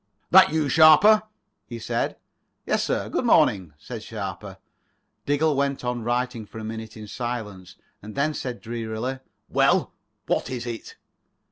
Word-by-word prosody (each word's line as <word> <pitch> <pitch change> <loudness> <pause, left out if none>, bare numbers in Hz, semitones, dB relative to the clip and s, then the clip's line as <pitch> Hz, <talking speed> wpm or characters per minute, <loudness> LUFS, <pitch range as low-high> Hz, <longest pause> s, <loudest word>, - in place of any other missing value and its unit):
"That - - +8
you, 155 -2 +1
Sharper?" 160 +9 +7 0.5
he 120 - -7
said. 115 - -2 0.5
"Yes, - - +1
sir. - - -1
Good - - -2
morning," 95 -6 +3
said 115 +8 -8
Sharper. 100 -4 -7 0.7
Diggle 145 +1 +2
went 140 -1 -1
on 125 -1 -2
writing 120 -1 -2
for 110 - -12
a 110 - -6
minute 110 0 -7
in 110 - -8
silence, 105 -6 -6 0.3
and 105 +1 -10
then 145 +3 +1
said 125 -4 -5
drearily: 115 +2 -4 0.3
"Well, - - +2 0.3
what - - -1
is 125 -2 -4
it?" 115 -2 -7
120 Hz, 145 wpm, -24 LUFS, 110-140 Hz, 0.7 s, That